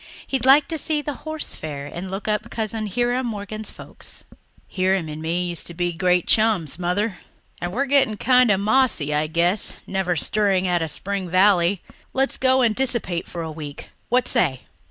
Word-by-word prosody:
He'd 265 -2 -1
like 280 +2 +7
to 320 -2 -1
see 300 -1 -1
the 290 - -3 0.2
Horse 315 -1 -3
Fair 145 -3 -6
and 175 +5 -6
look 195 +2 -5
up 215 +2 -1
Cousin 220 -1 -3
Hiram 245 +4 0
Morgan's 215 0 -5
folks. - - -10 0.4
"Hiram 185 -2 0
and 155 0 -6
me 170 +3 -1
used 170 - -3
to 170 - -6
be 175 0 0
great 180 +1 +2
chums, 205 -9 +2
Mother. 185 +3 -1 0.4
And 175 - -2
we're 265 +8 0
getting 270 -6 +3
kind 250 +2 +4
of 195 -2 +3
mossy, 210 - +2
I 150 +1 +1
guess, 175 +5 +1
never 190 -2 -1
stirring 190 +2 +1
out 175 -1 +1
of 160 - -1
Spring 190 +4 -3
Valley. 185 0 +3 0.3
Let's 270 +1 +1
go 260 0 +3
and 225 -3 +2
dissipate 235 -10 -1
for 170 -1 -5
a 160 - -5
week 150 -2 -8 0.2
what 250 0 +2
say?" 135 -7 +1
195 Hz, 185 wpm, -22 LUFS, 175-235 Hz, 0.4 s, like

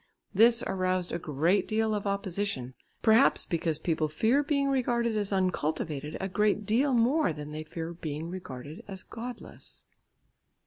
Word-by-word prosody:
This 235 +1 +6
aroused 185 -1 -1
a 170 - -2
great 160 +6 +1
deal 220 0 +1
of 205 -1 -2
opposition, 200 -9 -2 0.3
perhaps 220 0 +5
because 165 -2 -1
people 155 -1 0
fear 225 - +2
being 280 -1 +1
regarded 240 -4 +1
as 205 -1 -1
uncultivated 155 -5 -1
a 190 - -2
great 210 +2 +1
deal 250 +6 +2
more 245 - +3
than 150 -1 -7
they 155 +1 -5
fear 165 +2 -6
being 160 -1 -5
regarded 150 -4 -8
as 190 -2 -7
godless. 240 +2 -9
190 Hz, 145 wpm, -29 LUFS, 160-225 Hz, 0.3 s, This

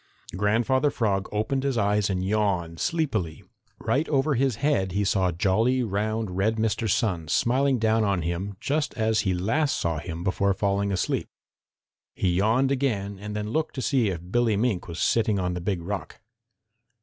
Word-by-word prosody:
Grandfather 120 +8 +2
Frog 100 -8 -1
opened 130 +6 -1
his 135 -2 -1
eyes 105 -1 +2
and 95 -1 -1
yawned 95 -5 0
sleepily. 115 - -1 0.3
Right 150 +5 0
over 145 0 +2
his 135 -2 +1
head 115 -8 0
he 100 +1 +1
saw 95 -2 +1
jolly, 110 +9 +2
round, 110 0 -2
red 105 +4 +1
Mr. 110 0 0
Sun 90 -6 0
smiling 130 - +2
down 110 0 +2
on 100 -5 0
him 90 +4 -3
just 145 +1 -1
as 110 -1 +1
he 95 -4 +1
last 140 - 0
saw 80 -2 -1
him 85 +1 -6
before 100 +1 +1
falling 100 0 0
asleep. 95 - -1 0.9
He 95 - +1
yawned 115 +7 +2
again 105 -8 -1
and 105 +1 -6
then 105 0 -3
looked 160 +4 -1
to 130 - -3
see 125 -7 +2
if 90 0 -6
Billy 120 -3 +2
Mink 110 -4 0
was 85 -1 -7
sitting 110 -3 +2
on 90 -1 -1
the 90 - -4
Big 90 -1 -2
Rock. 90 -4 -5
105 Hz, 175 wpm, -26 LUFS, 95-120 Hz, 0.9 s, Grandfather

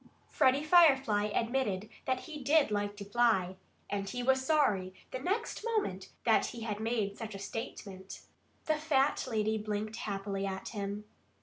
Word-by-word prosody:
Freddie 270 0 +3
Firefly 270 -11 +5
admitted 215 -2 -1 0.2
that 260 -1 0
he 300 -4 -8
did 290 -2 +4
like 205 0 -1
to 200 - -7
fly. 200 -4 +2 0.3
And 200 -1 -3
he 245 0 -3
was 265 +1 +3
sorry, 215 -11 +2 0.2
the 255 - -3
next 410 - -2
moment, 420 - -1
that 225 -1 +4
he 235 - -7
had 210 -2 -3
made 220 -3 -1
such 220 -3 -6
a - - -4
statement. 195 -2 -7 0.4
For 310 - +1
the 305 - -3
fat 285 -3 +2
lady 220 -1 0
blinked 215 +1 -3
happily 195 -2 -3
at 190 0 -4
him. 205 -1 -4
220 Hz, 165 wpm, -32 LUFS, 200-265 Hz, 0.4 s, Firefly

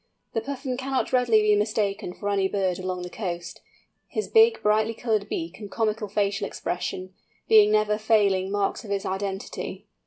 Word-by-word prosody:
The 225 - 0
Puffin 260 0 -4
cannot 265 0 -2
readily 235 -4 +4
be 210 0 +4
mistaken 205 -3 -1
for 205 - -5
any 195 -1 +1
other 205 - -3
bird 185 -2 0
along 185 -1 -3
the 180 - -6
coast, 175 -4 -5 0.5
his 430 - -3
big 450 0 +5
brightly 215 +2 +2
coloured 215 -3 -1
beak 165 +3 -4
and 205 -2 -8
comical 215 0 -1
facial 200 0 0
expression, 185 +1 -4 0.3
being 210 -1 +7
never 215 0 +2
failing 200 -4 +2
marks 205 +3 -1
of 215 - -10
his 200 0 -1
identity. 195 0 -4
210 Hz, 175 wpm, -25 LUFS, 195-225 Hz, 0.5 s, being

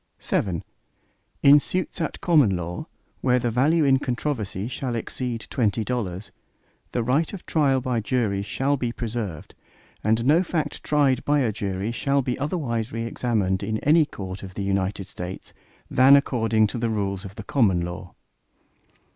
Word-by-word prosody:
VII 90 -5 -1 0.8
In 140 +1 +8
suits 185 +3 -3
at 160 - -3
common 145 - +4
law, 85 0 -5 0.3
where 125 -1 +3
the 120 -1 0
value 150 +7 +3
in 135 -1 +4
controversy 120 -7 -2
shall 125 -1 -3
exceed 115 0 -4
twenty 110 -3 +1
dollars, 100 -4 -3 0.6
the 120 - 0
right 140 +7 +1
of 195 - -8
trial 140 -4 +2
by 125 -2 -1
jury 110 -3 0
shall 135 +7 0
be 120 -2 -2
preserved, 110 -9 -5 0.5
and 110 +2 +2
no 155 +6 +5
fact 170 -3 -2
tried 140 -4 +2
by 145 0 +2
a 120 -4 +1
jury 100 +1 -3
shall 140 +3 +1
be 125 -1 -1
otherwise 130 -7 -2
re 115 0 -3
examined 105 -6 0
in 110 +2 -1
any 155 +1 +5
court 95 -5 -7
of 95 -1 -9
the 100 - -3
United 95 0 -1
States, 90 +1 -8 0.3
than 130 +2 +6
according 115 -5 +2
to 110 +3 -3
the 115 0 0
rules 100 -3 -2
of 100 0 -9
the 110 - -7
common 100 -9 +2
law. 90 +1 -6
115 Hz, 165 wpm, -24 LUFS, 100-135 Hz, 0.8 s, In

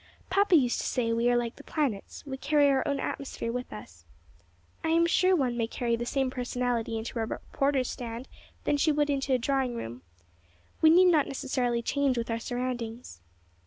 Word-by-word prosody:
Papa 395 -1 +4
used 250 -6 +3
to - - -3
say 230 -3 0
we 230 +1 +2
are 245 - +3
like 240 -1 -2
the 290 - -12
planets; 275 -11 -3
we 270 -2 -4
carry 290 +1 +3
our 270 -1 +3
own 280 -1 0
atmosphere 265 -4 -4
with 250 +1 -5
us. 85 -6 -11 0.8
I - - -1
am 335 +1 +4
sure 370 +2 +3
one 260 -7 0
may 230 -1 0
carry 235 0 -1
the 240 +1 -4
same 265 -1 0
personality 245 -2 -2
into 225 +1 -4
a 225 - 0
reporter's 275 +1 -1
stand 235 +1 -6 0.4
that 290 - +1
she 310 - +3
would 295 0 +1
into 275 -1 -1
a - - +3
drawing 260 0 0
room. 120 - -6 0.8
We 315 - +7
need 360 +2 +7
not 305 -4 +3
necessarily 245 -3 -1
change 280 0 +1
with 230 0 -2
our 230 - -1
surroundings." 240 - -4
250 Hz, 195 wpm, -28 LUFS, 235-285 Hz, 0.8 s, We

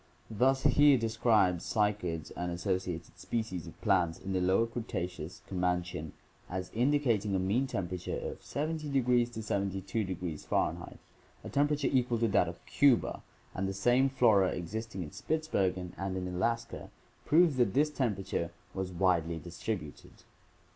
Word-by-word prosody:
Thus 130 +5 +2
Heer 145 -2 +6
describes 110 -6 +2
cycads 100 -7 -1
and 90 0 -3
associated 90 -2 -3
species 110 -7 -3
of - - -12
plants 85 -4 +2
in 95 0 -5
the 95 - +1
lower 95 +5 +3
Cretaceous 90 -8 -5
(Comanchian) 90 -4 -2 0.4
as 90 0 -4
indicating 120 -5 +2
a - - +3
mean 105 +9 +1
temperature 90 -6 -3
of - - -6
700 155 0 -3 0.4
to 110 - -5
720 95 -3 -2
F. 75 - -2 0.2
— - - -30
a - - -6
temperature 145 0 +1
equal 125 -3 +2
to 115 0 +2
that 95 -3 +3
of 85 - -11
Cuba 140 -5 +3 0.2
— - - -31
and 95 +1 -2
the 95 - -2
same 120 +7 +3
flora 110 -8 +4
existing 95 +2 -4
in 75 - -9
Spitsbergen 95 - -1
and 95 -1 -2
in 90 0 -3
Alaska 115 +6 -2 0.3
proves 160 -3 +4
that 120 -4 +2
this 150 +2 +3
temperature 100 - -1 0.2
was 95 -1 -3
widely 85 -2 +1
distributed. 85 -1 -6
95 Hz, 145 wpm, -31 LUFS, 90-120 Hz, 0.4 s, Heer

